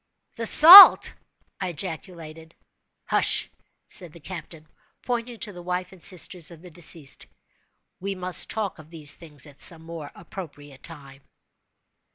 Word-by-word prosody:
"The 230 0 0
salt!" 360 - +9 0.5
I 190 - -5
ejaculated. 165 -1 -9 0.5
"Hush!" - - -1 0.4
said 175 -6 -1
the 170 - -15
captain, 165 -2 -12 0.4
pointing 240 -1 -6
to 205 - -4
the 175 - -12
wife 180 +1 -6
and 190 -2 -18
sisters 180 -2 -2
of 170 -1 -15
the 180 - -15
deceased. 160 -4 -6 0.7
"We 195 +1 -6
must 185 -1 +2
talk 210 -6 -6
of 155 0 -17
these 155 -3 0
things 150 -5 -9
at 145 -1 -19
some 165 -2 +1
more 165 -3 -11
appropriate 145 -6 -13
time." 140 -4 -13
170 Hz, 140 wpm, -22 LUFS, 155-185 Hz, 0.7 s, salt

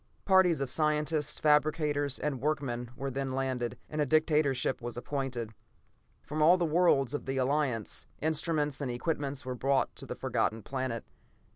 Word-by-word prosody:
Parties 190 -5 +4
of 135 -2 -1
scientists, 150 0 +1
fabricators, 150 -2 +2
and 140 -4 -2
workmen 130 -5 -1
were 135 +2 -4
then 135 0 -3
landed, 130 -2 -2
and 155 0 -2
a - - +3
dictator 155 -2 +3 0.3
was 120 0 -6
appointed. 125 -4 -3 0.7
From 155 +1 -3
all 170 +4 +7
the 175 - +1
worlds 155 -5 +3
of 145 - -4
the 135 0 -1
Alliance, 130 -4 -1
instruments 155 -2 0
and 135 - -2
equipment 140 +1 -2
were 130 - -3
brought 135 +2 +1
to - - -8
the - - -5
Forgotten 110 0 -1
Planet. 130 -4 -3
145 Hz, 155 wpm, -30 LUFS, 130-155 Hz, 0.7 s, all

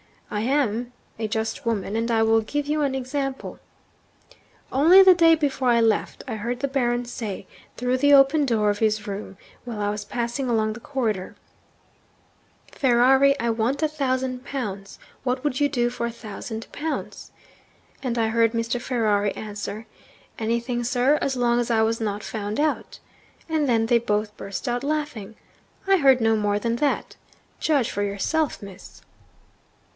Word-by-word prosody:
I 210 - -1
am 245 -2 0 0.3
a 220 - -1
just 220 +5 -3
woman; 215 -3 -2
and 230 +1 -1
I 225 -1 +3
will 225 0 +4
give 290 +6 -3
you 300 +1 0
an 275 -2 0
example. 270 +1 -4 1.1
Only 335 +9 +7
the 380 -1 +8
day 330 -2 +5
before 280 -4 -1
I 235 -1 +4
left, 225 -2 0
I 225 -4 -3
heard 240 +4 -4
the 280 - +1
Baron 245 -2 0
say 220 -5 -6 0.3
(through 250 +1 0
the 285 +2 +4
open 280 +2 +5
door 215 -5 +2
of 205 - -4
his 215 -1 +1
room 200 -2 -6 0.3
while 235 -3 -6
I 205 0 0
was 210 0 -5
passing 240 +4 -3
along 215 -2 +1
the 230 - -9
corridor), 230 -8 -3 1.4
"Ferrari, 265 +2 +4
I 235 0 +1
want 230 +7 -1
a - - +4
thousand 260 -3 -2
pounds. 200 -8 -5 0.3
What 255 0 -1
would 275 -4 -1
you 290 0 +3
do 240 -4 +1
for 235 -1 -3
a - - -4
thousand 220 0 -7
pounds?" 310 +1 -5 0.7
And 245 -3 -2
I 225 -1 +1
heard 230 0 +2
Mr. 230 +1 -1
Ferrari 215 -5 0
answer, 210 0 -6 0.5
"Anything, 235 +2 -1
sir, 255 +5 +2
as 270 - 0
long 240 -1 +2
as 240 - -1
I 225 -1 +3
was 225 +1 0
not 205 -1 -2
found 210 +1 -4
out." 305 0 -1 0.5
And 310 -2 +1
then 225 -2 +3
they 235 0 +4
both 210 -2 -1
burst 195 +6 -6
out 245 +1 -1
laughing. 285 -8 -3 0.5
I 390 0 +5
heard 270 -6 +5
no 225 0 +3
more 205 -1 +1
than 230 +2 -1
that. 290 +2 -1 0.4
Judge 285 -7 +1
for 205 - -3
yourself, 205 +9 -1
Miss.' 195 -1 -12
240 Hz, 170 wpm, -24 LUFS, 220-270 Hz, 1.4 s, the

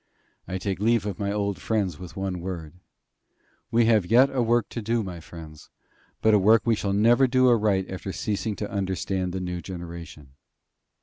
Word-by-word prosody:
I 95 +1 -3
take 95 0 -3
leave 115 0 +2
of 100 -4 -4
my 100 -1 -1
old 100 -1 -2
friends 100 -8 -1
with 90 -3 -10
one 95 -2 -3
word: 85 -4 -6 1.0
We 115 0 +3
have 110 -3 +4
yet 125 +6 +5
a 130 - 0
work 120 -1 +2
to 115 - -5
do, 115 +1 0
my 90 -3 -7
friends; 80 -2 -12 0.5
but 110 - +5
a 105 - +6
work 105 +2 +5
we 115 - +3
shall 105 -2 -1
never 120 +6 +4
do 130 0 +3
aright 105 -5 +2
after 95 +1 -6
ceasing 105 +2 -2
to 105 - -5
understand 95 -1 -2
the 95 - -3
new 90 -1 -4
generation. 85 -6 -9
100 Hz, 185 wpm, -25 LUFS, 90-110 Hz, 1.0 s, a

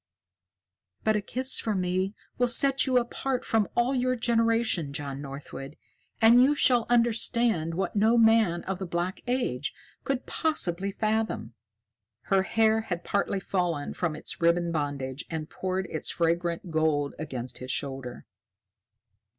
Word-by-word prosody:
"But 220 0 +2
a 210 - +1
kiss 260 +5 +1
from 210 -4 -1
me 185 +3 -1 0.2
will 245 - +3
set 270 +3 +4
you 255 -1 +3
apart 250 +2 -1
from 220 -2 +1
all 240 +3 +2
your 255 -1 +1
generation, 230 - +1
John 140 -1 -5
Northwood, 140 0 -8 0.4
and 230 +2 +7
you 280 +3 +4
shall 245 -5 +4
understand 235 -7 +2
what 190 +2 -2
no 220 +3 +4
man 225 -6 +4
of 190 -1 -4
the 190 - -4
Black 175 +3 -3
Age 240 - -1 0.3
could 270 -2 -2
possibly 200 - -1
fathom." 215 - -1 0.8
Her 195 - +5
hair 220 +2 +2
had 175 -5 -4
partly 200 0 0
fallen 175 -6 -2
from 170 -4 -2
its 155 - -6
ribbon 170 0 +2
bandage 145 -3 -3
and 155 -2 -5
poured 185 0 -2
its - - -3
fragrant 170 +1 -1
gold 155 -3 +1
against 130 -5 -4
his 130 - -8
shoulder. 135 -3 -4
190 Hz, 140 wpm, -27 LUFS, 160-230 Hz, 0.8 s, and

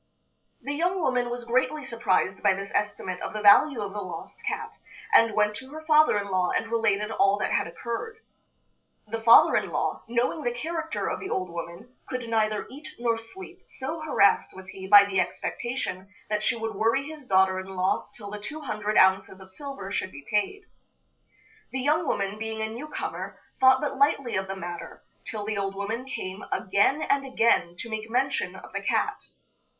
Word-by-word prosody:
The 280 +3 -3
young 355 +5 0
woman 250 -6 +1
was 240 0 -4
greatly 255 +5 0
surprised 225 -6 0
by 190 - +4
this 195 +1 -6
estimate 200 -3 -2
of - - -4
the 215 - -4
value 215 +5 +6
of 200 -1 -4
the 205 - -4
lost 175 -4 -8
cat, - - -3 0.4
and 230 -1 +6
went 210 0 +2
to 260 - -10
her 315 +2 -9
father 310 -6 +5
in 200 -1 -3
law 185 -1 +2
and 225 0 -1
related 215 -2 +1
all 200 -2 +3
that - - -1
had - - +1
occurred. 235 - -5 0.9
The 225 +1 -5
father 230 +1 +7
in - - +1
law, - - -1
knowing 240 +6 0
the 245 -4 0
character 320 +5 -3
of - - -2
the 380 - -6
old 185 -2 -2
woman, 170 +8 -8 0.2
could 250 -2 -4
neither 215 -2 0
eat 285 +3 -10
nor 235 -1 0
sleep, 370 +10 -12
so 295 +5 -5
harassed 290 -14 +3
was 185 0 -11
he 190 0 -8
by 200 0 +9
the 195 -2 0
expectation 195 +2 -3 0.2
that 210 0 +1
she 230 - +1
would 225 -1 -4
worry 225 +6 +1
his 300 -4 -10
daughter 190 0 +3
in 190 0 -8
law 185 +1 0
till 205 -3 -9
the 210 - -5
two 305 +10 -7
hundred 215 -6 -2
ounces 190 0 +4
of 190 0 -14
silver 270 -6 -7
should 185 - -2
be 140 0 -11
paid. 210 - 0 1.1
The 265 - -2
young 300 +4 +1
woman, 200 -1 -1
being 220 0 -3
a 220 - -2
new 260 +7 -7
comer, - - -5 0.2
thought 260 0 +6
but 295 - -2
lightly 275 -3 +2
of 190 0 -1
the 195 - -4
matter, 175 -2 -7 0.2
till 210 -2 -5
the 215 -1 -2
old 195 0 -2
woman 220 +5 -3
came 190 -6 -6
again 205 +10 +2
and 280 0 +1
again 230 -9 +2
to 230 - -7
make 220 0 -4
mention 260 +4 0
of - - -12
the - - -2
cat. - - -1
220 Hz, 195 wpm, -26 LUFS, 195-265 Hz, 1.1 s, by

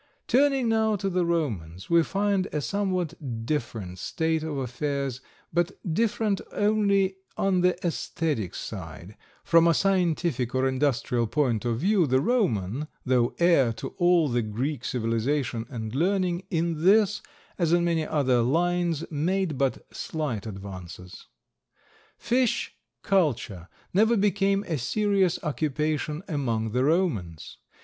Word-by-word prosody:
Turning 270 -1 +3
now 220 -1 +2
to 195 0 -2
the 180 0 +1
Romans, 105 - -2
we 170 0 +5
find 195 +2 0
a 150 - -1
somewhat 165 - -2
different 110 -10 -3
state 160 - -1
of 155 -2 -4
affairs, 135 0 -3 0.3
but 175 +2 +1 0.2
different 215 0 0
only 200 -2 +2 0.2
on 190 -2 +2
the 180 0 +2
aesthetic 155 - -2
side; 85 -1 -7 0.3
from 165 0 +5
a 165 - +4
scientific 170 -10 +1
or 130 +1 +2
industrial 130 -3 0
point 120 -2 0
of 115 -1 0
view 190 0 +3
the 130 0 +3
Roman, 150 - 0 0.2
though 125 -2 +2
heir 170 -9 +4
to 115 - -6
all 175 -3 +4
the 120 -2 0
Greek 120 +5 -3
civilization 120 +1 -1
and 110 -4 -5
learning, 180 +3 0
in 165 -2 -1
this, 205 +2 +4 0.4
as 170 -2 +2
in 175 0 +4
many 165 -2 +1
other 130 -6 +2
lines, 170 +4 +1
made 170 +2 0
but 135 0 -1
slight 135 -10 -3
advances. 95 -3 -9 0.9
Fish 245 0 0 0.3
culture 125 - 0 0.3
never 220 +5 +4
became 200 0 +2
a 160 -7 -3
serious 195 - +1
occupation 150 +1 -1
among 115 - -1
the 125 +3 +1
Romans. 135 - -1
155 Hz, 130 wpm, -26 LUFS, 120-185 Hz, 0.9 s, we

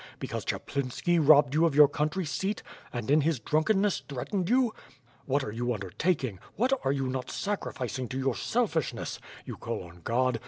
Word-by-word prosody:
Because - - -4
Chaplinski 140 +6 -1
robbed 145 -2 +6
you 160 +2 +3
of 150 - -2
your 150 0 +9
country 155 +6 -1
seat, 195 +7 -2 0.3
and, 120 +1 -3
in 150 +1 +6
his 155 -2 +1
drunkenness, 190 - +2
threatened 170 +8 -2
you! 250 -2 +3 0.5
What 140 +1 +1
are 105 - -4
you 120 +3 -3
undertak 125 - 0
ing; 105 -8 -4 0.2
what 255 +5 +2
are 135 - +2
you 135 -1 -1
not 130 0 -3
sacrificing 130 - -3
to 130 - -5
your 135 -2 0
selfishness? 205 - -1 0.3
You - - -6
call - - -4
on 85 0 -14
God! 125 +2 +1
140 Hz, 180 wpm, -29 LUFS, 125-175 Hz, 0.5 s, your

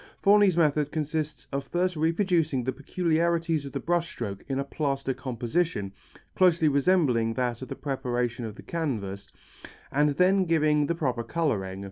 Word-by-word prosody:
Forni's 200 -3 +5
method 150 -2 +2
consists 155 0 -3
of 140 0 -2
first 180 +5 -1
reproducing 165 -4 +1
the 130 - -1
peculiarities 165 +1 0
of - - -8
the - - -3
brush 170 -1 0
strokes 100 -9 -6
in 135 - -1
a 140 - 0
plaster 135 -1 -2
composition 125 - -2 0.4
closely 170 -4 +4
resembling 140 -7 +2
that 125 -2 -1
of 130 - -6
the - - -6
preparation 125 -4 -2
of 110 -2 -6
the - - -12
canvas, 105 - -4 0.6
and 145 +2 +3
then 190 +1 +4
giving 155 -3 +2
the 170 - 0
proper 130 -8 -1
colouring. 110 - -2
150 Hz, 155 wpm, -27 LUFS, 125-170 Hz, 0.6 s, Forni's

